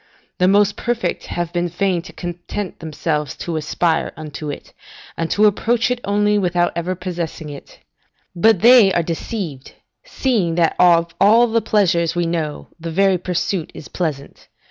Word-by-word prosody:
The 180 - +4
most 200 +1 +3
perfect 240 -1 -2
have 175 -1 -4
been 175 0 -1
fain 180 0 0
to 185 - -12
content 175 +2 -6
themselves 150 -2 -3
to 170 - -4
aspire 160 +2 0
unto 155 -1 -7
it, 145 - -8 0.4
and 165 0 -3
to 210 - +3
approach 225 +4 +2
it 250 -1 -2
only, 205 +1 +2
without 175 -2 +1
ever 175 +2 -2
possessing 170 -4 -5
it. 140 - -12 0.6
But 195 +2 +3
they 235 -3 +7
are 170 - +1
deceived, 165 - -5 0.3
seeing 230 - -1
that 170 -1 +2
of 170 -2 +4
all 225 +4 +6
the 230 -1 +1
pleasures 175 -7 +1
we 175 0 0
know, 165 -3 -3
the 165 +1 -5
very 190 +2 +2
pursuit 180 -1 -2
is - - -10
pleasant. 150 -6 -5
175 Hz, 160 wpm, -19 LUFS, 165-205 Hz, 0.6 s, they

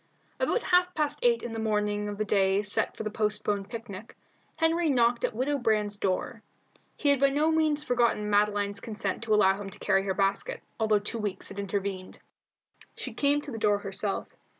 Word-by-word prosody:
About - - +1
half 360 0 +2
past 295 -1 -1
eight 235 -1 +2
on 240 - -5
the 225 - -4
morning 210 -1 0
of 205 - -5
the 215 - -1
day 195 0 +2
set 210 - -1
for - - -4
the 215 - -3
postponed 210 -2 -1
picnic, 225 -2 -8 0.4
Henry 325 +1 +2
knocked 240 -3 +2
at - - -1
Widow 280 +4 0
Brand's 210 -3 +1
door. 205 +4 -2 0.6
He 290 - +1
had 280 -2 +4
by 275 0 +4
no 300 +3 +2
means 310 -2 +2
forgotten 240 -6 +1
Madeline's 205 0 +1
consent 210 -4 -4
to 215 -1 +3
allow 195 -1 +3
him 195 - -6
to - - -11
carry 195 - +2
her 190 -1 -1
basket, 195 +1 -1 0.2
although 220 -1 +3
two 210 +3 -2
weeks 205 -3 -3
had 200 - -7
intervened. 195 -1 -4 0.8
She - - -6
came 290 0 +2
to 290 - -8
the 225 - -5
door 205 -1 +3
herself. 195 0 -4
215 Hz, 195 wpm, -28 LUFS, 200-255 Hz, 0.8 s, had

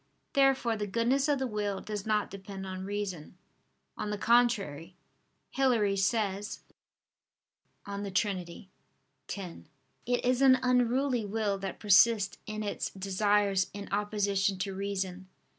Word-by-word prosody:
Therefore 270 -4 +3
the 210 -1 -3
goodness 240 +7 +1
of 290 -1 +2
the 265 - -1
will 205 -4 -2
does 210 -1 -5
not 210 -1 +1
depend 195 0 -8
on 185 0 -5
reason. 195 -5 -5 0.6
On 210 - -4
the 210 - -2
contrary, 200 -9 +2 0.6
Hilary 235 -7 +2
says 200 0 -1 1.2
(De 200 0 -4
Trin. 195 +1 +1 0.9
x): 185 -4 -7 0.4
"It 245 0 0
is 250 +1 +2
an 260 -1 +7
unruly 250 0 +2
will 205 -1 -1
that 195 -1 -5
persists 205 -1 +4
in 215 0 -4
its 205 - -3
desires 195 0 +1
in 200 0 -7
opposition 200 -1 0
to 190 +1 -3
reason." 190 -1 -4
205 Hz, 125 wpm, -30 LUFS, 195-230 Hz, 1.2 s, an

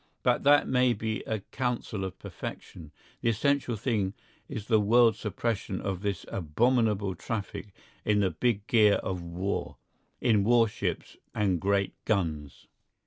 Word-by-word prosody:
But - - +3
that 145 +1 +6
may 125 -1 +3
be 110 0 -3
a 110 -2 -2
counsel 120 -5 -2
of 95 0 -5
perfection. 80 -4 -8 0.3
The 115 - +2
essential 130 +2 +1
thing 105 -4 -1 0.3
is 105 - -5
the 110 -2 +3
world 115 +1 +5
suppression 105 -2 -3
of 95 -2 -3
this 100 -4 -2
abominable 105 +3 +1
traffic 100 -1 -5 0.4
in 105 -1 +2
the 95 -2 +2
big 100 +5 0
gear 110 -6 +5
of 90 -2 -3
war, 85 +3 -3 0.4
in 110 -5 +3
warships 115 -1 +1 0.2
and 95 -5 +1
great 100 0 +1
guns. 80 -9 -2
105 Hz, 140 wpm, -28 LUFS, 95-115 Hz, 0.4 s, that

